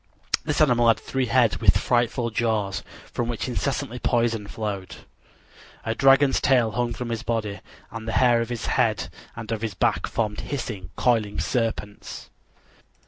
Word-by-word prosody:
This 150 Hz, -1 st, 0 dB
animal 120 Hz, -5 st, +4 dB
had 115 Hz, -, +5 dB
three 130 Hz, -1 st, -2 dB
heads 115 Hz, -6 st, +3 dB
with -, -, +5 dB
frightful 120 Hz, 0 st, +1 dB
jaws, 110 Hz, -4 st, 0 dB, 0.3 s
from 120 Hz, -, -1 dB
which 120 Hz, 0 st, -3 dB
incessantly 130 Hz, 0 st, -2 dB
poison 115 Hz, -4 st, +1 dB
flowed. 100 Hz, -3 st, -4 dB, 0.9 s
A 110 Hz, -, 0 dB
dragon's 135 Hz, +2 st, +4 dB
tail 125 Hz, -5 st, +3 dB
hung 120 Hz, +3 st, -1 dB
from 120 Hz, +1 st, -5 dB
his 115 Hz, -2 st, -2 dB
body, 110 Hz, -3 st, -2 dB, 0.3 s
and 115 Hz, -1 st, -7 dB
the 110 Hz, -, -2 dB
hair 120 Hz, -2 st, +4 dB
of 115 Hz, -, -3 dB
his 120 Hz, -2 st, -4 dB
head 110 Hz, -8 st, +1 dB, 0.3 s
and 115 Hz, -1 st, -7 dB
of 110 Hz, -1 st, -2 dB
his 110 Hz, -4 st, -3 dB
back -, -, +1 dB
formed 105 Hz, -2 st, -2 dB
hissing, 110 Hz, -10 st, -5 dB
coiling 110 Hz, -5 st, +1 dB
serpents. 115 Hz, -4 st, -3 dB
115 Hz, 155 wpm, -25 LUFS, 110-125 Hz, 0.9 s, had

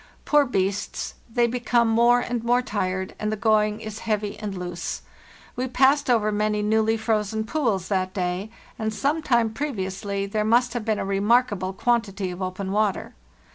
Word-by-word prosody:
Poor 295 Hz, -1 st, +4 dB
beasts, 195 Hz, -3 st, -2 dB, 0.2 s
they 240 Hz, +1 st, +3 dB
become 240 Hz, 0 st, +1 dB
more 235 Hz, +2 st, +4 dB
and 240 Hz, -2 st, -3 dB
more 245 Hz, +1 st, +2 dB
tired, 190 Hz, -5 st, -2 dB
and 215 Hz, 0 st, -1 dB
the -, -, 0 dB
going 215 Hz, -1 st, +2 dB
is 215 Hz, -1 st, -7 dB
heavy 210 Hz, -2 st, -2 dB
and 205 Hz, -3 st, -5 dB
loose. 175 Hz, -1 st, -5 dB, 0.5 s
We 255 Hz, +1 st, -2 dB
passed 270 Hz, +3 st, +3 dB
over 215 Hz, -3 st, +3 dB
many 210 Hz, 0 st, 0 dB
newly 220 Hz, +1 st, +2 dB
frozen 220 Hz, -1 st, 0 dB
pools 220 Hz, -, -1 dB
that 185 Hz, -2 st, 0 dB
day, 185 Hz, +2 st, -2 dB, 0.3 s
and 220 Hz, -1 st, -1 dB
some 285 Hz, +8 st, 0 dB
time 235 Hz, -6 st, +2 dB
previously 200 Hz, -6 st, -3 dB
there 210 Hz, +2 st, -1 dB
must 240 Hz, +2 st, +3 dB
have 240 Hz, -3 st, -3 dB
been 220 Hz, -2 st, +1 dB
a_ 195 Hz, -, -3 dB
remarkable 205 Hz, -1 st, +2 dB
quantity 200 Hz, -3 st, 0 dB
of 180 Hz, +2 st, -8 dB
open 185 Hz, +1 st, -3 dB
water. 210 Hz, -1 st, 0 dB
215 Hz, 170 wpm, -24 LUFS, 195-235 Hz, 0.5 s, Poor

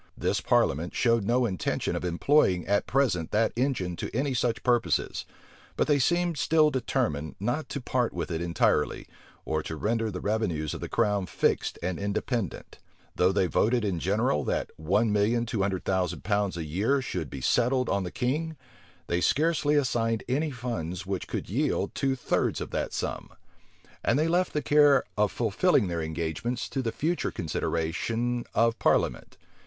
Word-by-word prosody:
This -, -, 0 dB
parliament 80 Hz, +6 st, +1 dB
showed 115 Hz, -4 st, +2 dB
no 120 Hz, +3 st, +2 dB
intention 95 Hz, -7 st, -1 dB
of -, -, -3 dB
employing 90 Hz, -, +2 dB
at 100 Hz, +1 st, +1 dB
present 120 Hz, -, +1 dB
that 110 Hz, +1 st, +1 dB
engine 120 Hz, -9 st, -1 dB
to -, -, -4 dB
any 135 Hz, +2 st, 0 dB
such 120 Hz, -2 st, 0 dB
purposes; 120 Hz, -2 st, +1 dB, 0.5 s
but -, -, +3 dB
they 145 Hz, -2 st, +3 dB
seemed 175 Hz, +3 st, +1 dB
still 155 Hz, -1 st, +4 dB
determined 115 Hz, -, -1 dB
not 120 Hz, +10 st, -2 dB
to 140 Hz, -, -3 dB
part 125 Hz, -2 st, 0 dB
with 85 Hz, 0 st, -4 dB
it 80 Hz, 0 st, -2 dB
entirely, 85 Hz, -3 st, +1 dB, 0.4 s
or 80 Hz, 0 st, -1 dB
to 80 Hz, -, -5 dB
render 115 Hz, +6 st, 0 dB
the 90 Hz, -3 st, -5 dB
revenues 90 Hz, -9 st, -1 dB
of -, -, -7 dB
the -, -, -5 dB
crown 100 Hz, -3 st, +1 dB
fixed -, -, 0 dB
and 90 Hz, 0 st, -2 dB
independent. 100 Hz, -, -3 dB, 0.4 s
Though 90 Hz, +1 st, +3 dB
they 95 Hz, -1 st, +2 dB
voted 115 Hz, +5 st, +1 dB
in 95 Hz, -4 st, -1 dB
general, 95 Hz, -, +1 dB
that -, -, -1 dB
one 105 Hz, +7 st, +1 dB
million 110 Hz, +3 st, +2 dB
two 115 Hz, -3 st, -2 dB
hundred 95 Hz, -2 st, -1 dB
thousand 90 Hz, -2 st, -1 dB
pounds 100 Hz, -2 st, 0 dB
a 85 Hz, -, -3 dB
year 105 Hz, -, +1 dB
should 85 Hz, -, -4 dB
be 70 Hz, -, -6 dB
settled 125 Hz, -, +2 dB
on 100 Hz, -1 st, 0 dB
the 90 Hz, -, -4 dB
king, 150 Hz, -, -2 dB, 0.5 s
they 85 Hz, +1 st, -1 dB
scarcely 150 Hz, -, +2 dB
assigned 115 Hz, -5 st, +1 dB
any 145 Hz, +5 st, 0 dB
funds 100 Hz, -, -4 dB
which 95 Hz, -1 st, -3 dB
could -, -, -4 dB
yield -, -, 0 dB
two 135 Hz, -1 st, 0 dB
thirds 125 Hz, -, 0 dB
of -, -, -6 dB
that -, -, -2 dB
sum. -, -, -4 dB, 0.7 s
And 125 Hz, -, +2 dB
they 155 Hz, +2 st, +2 dB
left 180 Hz, +2 st, +1 dB
the 150 Hz, -, -1 dB
care 145 Hz, -2 st, +5 dB
of 105 Hz, -1 st, +2 dB
fulfilling 115 Hz, -, +2 dB
their 85 Hz, -1 st, -2 dB
engagements 80 Hz, +10 st, -3 dB
to 135 Hz, -, -2 dB
the 115 Hz, -3 st, -2 dB
future 170 Hz, +8 st, -1 dB
consideration 110 Hz, +10 st, -2 dB
of 115 Hz, +1 st, +2 dB
parliament. -, -, +1 dB
115 Hz, 170 wpm, -27 LUFS, 90-130 Hz, 0.7 s, care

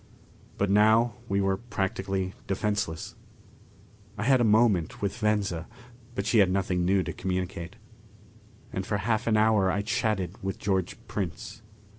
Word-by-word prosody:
But 100 Hz, -1 st, +1 dB
now 110 Hz, +3 st, +5 dB, 0.2 s
we 100 Hz, 0 st, +1 dB
were 95 Hz, 0 st, +1 dB
practically 95 Hz, -3 st, -2 dB
defenseless. 100 Hz, -4 st, -2 dB, 1.0 s
I 105 Hz, -, -2 dB
had 130 Hz, +1 st, +4 dB
a -, -, +4 dB
moment 105 Hz, -6 st, +3 dB
with 100 Hz, -2 st, -2 dB
Venza, 105 Hz, -7 st, 0 dB, 0.5 s
but 100 Hz, -, -2 dB
she 110 Hz, +1 st, +3 dB
had 95 Hz, -2 st, +5 dB
nothing 95 Hz, -1 st, 0 dB
new 95 Hz, +1 st, +3 dB
to -, -, -5 dB
communicate. 90 Hz, -2 st, -3 dB, 1.0 s
And 95 Hz, -, -2 dB
for 100 Hz, +2 st, -1 dB
half 110 Hz, +3 st, -1 dB
an 110 Hz, -1 st, +3 dB
hour 105 Hz, -3 st, +4 dB
I 100 Hz, +2 st, 0 dB
chatted 105 Hz, -5 st, -1 dB
with 95 Hz, 0 st, -3 dB
George 95 Hz, -3 st, -1 dB
Prince. 95 Hz, +2 st, -5 dB
100 Hz, 145 wpm, -27 LUFS, 95-110 Hz, 1.0 s, now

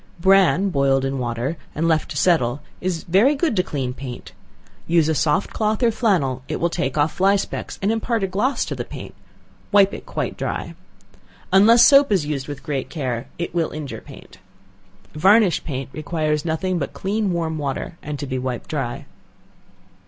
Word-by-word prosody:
Bran 195 Hz, +1 st, +4 dB
boiled 135 Hz, -2 st, +2 dB
in 135 Hz, 0 st, -2 dB
water, 120 Hz, +5 st, -2 dB, 0.2 s
and 165 Hz, +2 st, 0 dB
left 160 Hz, -2 st, +1 dB
to -, -, -5 dB
settle, 135 Hz, -7 st, +2 dB, 0.2 s
is 180 Hz, -2 st, -2 dB
very 210 Hz, -, +3 dB
good 295 Hz, -4 st, 0 dB
to 185 Hz, -, +3 dB
clean 135 Hz, -7 st, -3 dB
paint; 125 Hz, -1 st, -8 dB, 0.6 s
use 165 Hz, -2 st, +3 dB
a 160 Hz, -, +2 dB
soft 155 Hz, +5 st, +1 dB
cloth 215 Hz, +2 st, 0 dB
or 235 Hz, -, +4 dB
flannel; 175 Hz, -, +1 dB
it -, -, -3 dB
will 170 Hz, 0 st, 0 dB
take 135 Hz, -5 st, -2 dB
off 150 Hz, +2 st, +2 dB
fly 195 Hz, +2 st, +3 dB
specks 195 Hz, -, -4 dB
and 200 Hz, -, +2 dB
impart 225 Hz, -1 st, -1 dB
a -, -, +1 dB
gloss 235 Hz, +8 st, 0 dB
to -, -, -4 dB
the -, -, -4 dB
paint; -, -, -9 dB, 0.6 s
wipe 200 Hz, -1 st, +5 dB
it -, -, -8 dB
quite -, -, -3 dB
dry. -, -, -4 dB, 0.8 s
Unless 225 Hz, +5 st, +7 dB
soap 280 Hz, -2 st, +6 dB
is 185 Hz, -7 st, +2 dB
used 145 Hz, -3 st, -3 dB
with 145 Hz, -2 st, -7 dB
great 140 Hz, -4 st, -3 dB
care, 130 Hz, -5 st, -3 dB
it 170 Hz, -, -4 dB
will 170 Hz, -2 st, 0 dB
injure 150 Hz, -3 st, -6 dB
paint. -, -, -14 dB, 0.7 s
Varnished 195 Hz, +4 st, +4 dB
paint 135 Hz, -4 st, -4 dB
requires 155 Hz, -1 st, -2 dB
nothing 175 Hz, +2 st, -1 dB
but 140 Hz, -, -4 dB
clean 205 Hz, 0 st, -1 dB
warm 165 Hz, -2 st, -2 dB
water 145 Hz, +4 st, -4 dB
and 150 Hz, -1 st, -5 dB
to 145 Hz, -, -5 dB
be 130 Hz, -1 st, -3 dB
wiped 125 Hz, -2 st, -4 dB
dry. 135 Hz, -6 st, -3 dB
165 Hz, 180 wpm, -21 LUFS, 140-195 Hz, 0.8 s, Unless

